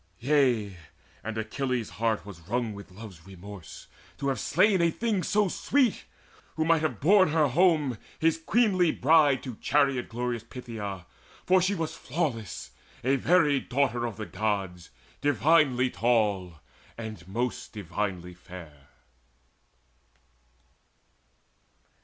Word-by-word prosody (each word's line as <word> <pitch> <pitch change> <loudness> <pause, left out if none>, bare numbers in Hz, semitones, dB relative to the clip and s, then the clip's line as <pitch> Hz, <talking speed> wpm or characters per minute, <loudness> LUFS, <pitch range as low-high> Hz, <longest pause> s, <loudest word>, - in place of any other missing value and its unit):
Yea, 120 -7 +1 0.5
and 110 +1 -5
Achilles' 125 +1 -2
very 90 - -14
heart 115 -3 0
was 100 -5 -10
wrung 120 -1 -1
With 100 -1 -11
love's 95 -3 -12
remorse 95 -1 -11 0.3
to 140 - -1
have 135 - -1
slain 185 +3 +3
a 170 - +4
thing 215 +2 -1
so 205 +2 +2
sweet, 255 +6 +1 0.5
Who 160 - 0
might 165 -1 +3
have 140 -10 -2
borne 185 +3 +5
her 150 -2 +2
home, 150 - +2 0.2
his 165 0 +2
queenly 190 -6 +3
bride, 145 -2 +4
To 125 -5 -7
chariot 140 -3 +1
glorious 120 0 -3
Phthia; 110 -6 -7 0.4
for 185 0 +4
she 190 +3 +1
was 165 -3 -3
Flawless, 125 - -4 0.3
a 135 +3 +3
very 150 0 +3
daughter 125 -3 0
of 115 - -7
the 110 - -5
Gods, 95 -6 -3 0.3
Divinely 140 -2 +3
tall, 100 -9 0 0.4
and 110 -6 -8
most 120 +6 -3
divinely 95 -3 -4
fair. 85 -5 -13
125 Hz, 125 wpm, -27 LUFS, 105-155 Hz, 0.5 s, borne